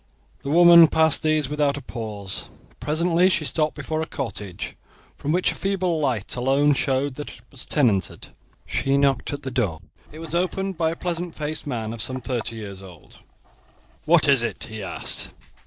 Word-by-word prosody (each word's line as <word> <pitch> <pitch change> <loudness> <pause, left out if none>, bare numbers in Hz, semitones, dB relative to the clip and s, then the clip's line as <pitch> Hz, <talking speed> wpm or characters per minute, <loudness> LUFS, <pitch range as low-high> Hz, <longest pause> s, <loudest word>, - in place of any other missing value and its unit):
The 140 - -5
woman 170 +1 +8
passed 160 0 +3
these 155 -2 +1
without 145 0 0
a - - -6
pause. 105 -5 -5 0.3
Presently 170 +4 +2
she 165 -4 0
stopped 155 0 0
before 155 0 -3
a 160 - -3
cottage, 105 - -5 0.4
from 145 - -3
which 180 +3 +2
a - - -5
feeble 185 -4 -1
light 125 -9 -1
alone 135 +4 +3
showed 135 0 0
that 150 - -6
it - - -12
was 135 - -11
tenanted. 110 - +1 0.4
She 135 0 0
knocked 140 -2 +1
at 145 - -5
the 130 - -4
door. 105 - -1 0.3
It 155 - -11
was 165 0 -7
opened 190 +2 -1
by 160 -1 +1
a 165 - -3
pleasant 175 -1 -3
faced 150 0 -3
man 115 -5 -3
of 115 - -2
some 130 +3 0
thirty 120 -2 -3
years 100 -3 -7
old. 90 -5 -14 0.9
"What 160 -1 +4
is 135 -3 +5
it?" 120 - -3
he 110 -1 -7
asked. 95 - -2
145 Hz, 180 wpm, -23 LUFS, 120-160 Hz, 0.9 s, woman